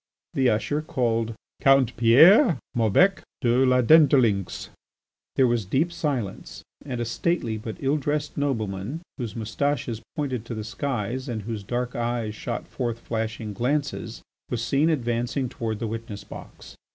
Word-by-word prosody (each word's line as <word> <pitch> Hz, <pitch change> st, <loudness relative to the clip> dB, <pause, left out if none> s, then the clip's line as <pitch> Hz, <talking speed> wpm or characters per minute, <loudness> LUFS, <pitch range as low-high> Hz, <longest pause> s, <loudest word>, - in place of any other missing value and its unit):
The 130 Hz, -2 st, +3 dB
usher 145 Hz, +8 st, 0 dB
called: 115 Hz, -6 st, -1 dB, 0.3 s
"Count 135 Hz, -3 st, +4 dB
Pierre 160 Hz, -, +7 dB, 0.2 s
Maubec 120 Hz, -, +3 dB, 0.2 s
de 120 Hz, +2 st, +3 dB
la 125 Hz, -1 st, +4 dB
Dentdulynx." 130 Hz, -, +4 dB, 0.7 s
There 130 Hz, -, +4 dB
was 120 Hz, -2 st, +1 dB
deep 135 Hz, -, 0 dB
silence, 135 Hz, -, -4 dB, 0.2 s
and 130 Hz, -4 st, -5 dB
a 120 Hz, -, -1 dB
stately 115 Hz, -1 st, -1 dB
but 110 Hz, 0 st, -6 dB
ill 140 Hz, +2 st, +1 dB
dressed 150 Hz, +1 st, -2 dB
nobleman, 115 Hz, -, -2 dB, 0.2 s
whose 120 Hz, -4 st, -4 dB
moustaches 115 Hz, +1 st, -2 dB
pointed 130 Hz, -6 st, -2 dB
to 120 Hz, -, -5 dB
the 110 Hz, -, -4 dB
skies 125 Hz, +2 st, -3 dB
and 110 Hz, -3 st, -3 dB
whose 110 Hz, 0 st, -4 dB
dark 125 Hz, +5 st, -3 dB
eyes 120 Hz, -2 st, -2 dB
shot -, -, -5 dB
forth 120 Hz, -2 st, -3 dB
flashing 110 Hz, -2 st, -4 dB
glances, 125 Hz, -1 st, -2 dB, 0.3 s
was 120 Hz, -2 st, -2 dB
seen 145 Hz, +4 st, +2 dB
advancing 120 Hz, -2 st, -1 dB
toward 110 Hz, -2 st, -3 dB
the 115 Hz, -, -4 dB
witness 110 Hz, -2 st, -6 dB
box. -, -, -11 dB
120 Hz, 145 wpm, -25 LUFS, 110-140 Hz, 0.7 s, Pierre